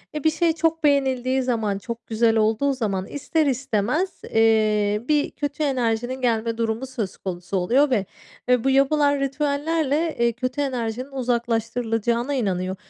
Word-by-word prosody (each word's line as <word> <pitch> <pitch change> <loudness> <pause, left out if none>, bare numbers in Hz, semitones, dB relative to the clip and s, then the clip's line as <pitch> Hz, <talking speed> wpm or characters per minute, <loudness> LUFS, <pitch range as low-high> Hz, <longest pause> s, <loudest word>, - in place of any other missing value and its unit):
ve 300 - -3
bir 315 - +5
şey 330 +1 +1
çok 325 0 0
beğenildiği 265 -2 +2
zaman, 220 -5 -1
çok 235 +3 -7
güzel 225 0 +2
olduğu 220 +6 +2
zaman 200 -7 -2
ister 310 +2 -1
istemez, 265 - -1
eee, 215 -2 +2
bir 295 -1 +1
kötü 290 +1 -3
enerjinin 250 -1 -1
gelme 230 -1 0
durumu 230 +2 -1
söz 225 -8 -5
konusu 180 +1 -4
oluyor 255 +11 +3
ve 215 -7 +1 0.4
ve 250 -2 +3
bu 270 - +2
yapılan 285 +1 +3
ritüellerle, 295 +3 0
eee, 235 0 +3
kötü 255 +3 -3
enerjinin 255 -1 -3
uzaklaştırılacağına 235 0 -1
inanıyor. 190 -7 -1
250 Hz, 145 wpm, -23 LUFS, 225-280 Hz, 0.4 s, bir